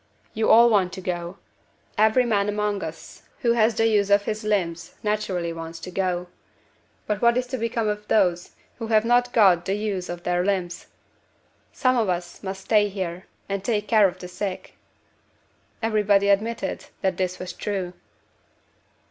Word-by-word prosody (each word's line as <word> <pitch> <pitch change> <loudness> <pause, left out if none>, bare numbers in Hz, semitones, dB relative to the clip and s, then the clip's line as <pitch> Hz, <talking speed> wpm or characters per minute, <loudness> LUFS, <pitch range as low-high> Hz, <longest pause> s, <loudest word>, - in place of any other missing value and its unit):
You 220 0 0
all 235 +1 +8
want 190 -4 +3
to - - -6
go. 175 0 -4 0.6
Every 220 +4 +4
man 205 -3 +1
among 210 -1 -1
us 160 +1 -9 0.2
who 240 -3 +3
has 230 -1 +3
the 225 - +2
use 205 -3 +2
of 200 0 +4
his 215 +1 -3
limbs 175 -6 -2
naturally 190 -5 -1
wants 165 0 -7
to 185 - -7
go. 180 -1 -1 0.8
But 210 -1 -2
what 235 0 +4
is 250 - 0
to - - 0
become 230 -1 -1
of 210 0 -3
those 180 -5 +1 0.2
who 225 - -4
have 220 0 +3
not 245 +1 +3
got 190 -7 +4
the 195 - 0
use 205 -3 -3
of 175 0 -6
their 180 0 0
limbs? 185 -3 -2 0.8
Some 255 -1 +1
of 220 -5 +1
us 175 -1 -3
must 190 -1 -5
stay 210 -2 +3
here, 185 -2 -5 0.2
and 195 -1 -3
take 210 -1 -1
care 215 -3 +5
of 180 0 -6
the 180 - -8
sick." 185 +1 -5 1.1
Everybody 205 -2 +3
admitted 205 0 0 0.2
that 190 -2 0
this 185 -1 -1
was 185 - -6
true. 190 -4 -3
200 Hz, 170 wpm, -24 LUFS, 180-215 Hz, 1.1 s, all